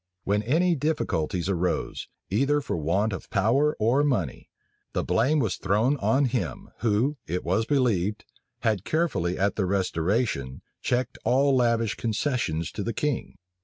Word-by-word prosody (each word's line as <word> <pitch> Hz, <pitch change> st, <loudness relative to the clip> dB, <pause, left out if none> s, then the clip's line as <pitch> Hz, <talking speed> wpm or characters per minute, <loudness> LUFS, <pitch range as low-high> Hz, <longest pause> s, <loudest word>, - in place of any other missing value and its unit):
When 100 Hz, +1 st, +1 dB
any 165 Hz, -, +2 dB
difficulties 115 Hz, -, -1 dB
arose, 90 Hz, -2 st, -1 dB, 0.2 s
either 140 Hz, +8 st, +2 dB
for 145 Hz, -, -3 dB
want 95 Hz, +7 st, 0 dB
of 95 Hz, -, -7 dB
power 130 Hz, +10 st, +2 dB
or 120 Hz, +7 st, +3 dB
money, 95 Hz, -, -1 dB, 0.4 s
the -, -, 0 dB
blame 130 Hz, +8 st, +2 dB
was 115 Hz, -10 st, +1 dB
still -, -, -8 dB
thrown 110 Hz, +9 st, +3 dB
on 135 Hz, +1 st, +2 dB
him, 105 Hz, -, -3 dB
who, 120 Hz, +6 st, +1 dB
it 90 Hz, +3 st, -2 dB
was 95 Hz, +7 st, 0 dB
believed, 110 Hz, -7 st, +1 dB, 0.4 s
had 110 Hz, -5 st, +1 dB
carefully 105 Hz, -, 0 dB
at 100 Hz, 0 st, 0 dB
the 95 Hz, -3 st, +1 dB
restoration 90 Hz, -, -1 dB, 0.2 s
checked 125 Hz, 0 st, -1 dB
all 135 Hz, +2 st, +3 dB
lavish 115 Hz, -3 st, +2 dB
concessions 115 Hz, -, -1 dB
to -, -, -5 dB
the 115 Hz, +3 st, -2 dB
king. 145 Hz, +3 st, -2 dB
110 Hz, 150 wpm, -26 LUFS, 95-135 Hz, 0.4 s, or